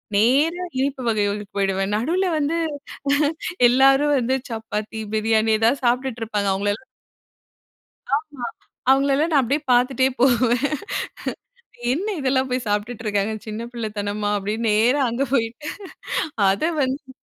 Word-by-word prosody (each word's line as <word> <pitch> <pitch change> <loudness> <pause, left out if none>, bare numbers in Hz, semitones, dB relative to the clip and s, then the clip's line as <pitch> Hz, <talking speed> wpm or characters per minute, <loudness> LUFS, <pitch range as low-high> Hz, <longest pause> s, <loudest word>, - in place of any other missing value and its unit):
நேரா 285 - +3 0.2
இனிப்பு 270 0 -1
வகைகளுக்கு 205 -2 -1
போயிடுவேன். 195 0 0
நடுவுல 340 - 0
வந்து 305 +2 0 1.1
எல்லாரும் 270 +3 +5
வந்து, 255 +1 +1
சப்பாத்தி, 220 -1 -4
பிரியாணி, 220 0 +2
எதாவது 235 +5 +2
சாப்டுட்டு 245 0 0
இருப்பாங்க. 210 -2 -1
அவங்கள 200 +1 0
எல்லா 240 - -16 1.3
ஆமா, 290 -4 -6 0.5
அவங்களல்லாம் 280 +4 +3
நான் 280 -3 +5
அப்டியே 280 +5 0
பார்த்துட்டே 255 +1 +3
போவேன். 250 0 +3 1.3
என்ன 345 +10 -1
இதெல்லாம் 260 -1 +1
போய் 250 0 -1
சாப்டுட்டு 210 +3 -2
இருக்காங்க. 205 +1 0
சின்ன 215 +1 -5
பிள்ளத்தனமா! 210 -2 -3
அப்டின்னு 215 +3 -2
நேரா 235 +7 +3
அங்க 245 +4 0
போய். 230 -4 +2 1.0
அத 195 +6 +1 0.2
வந்து 265 0 -2
240 Hz, 120 wpm, -22 LUFS, 215-270 Hz, 1.3 s, எல்லாரும்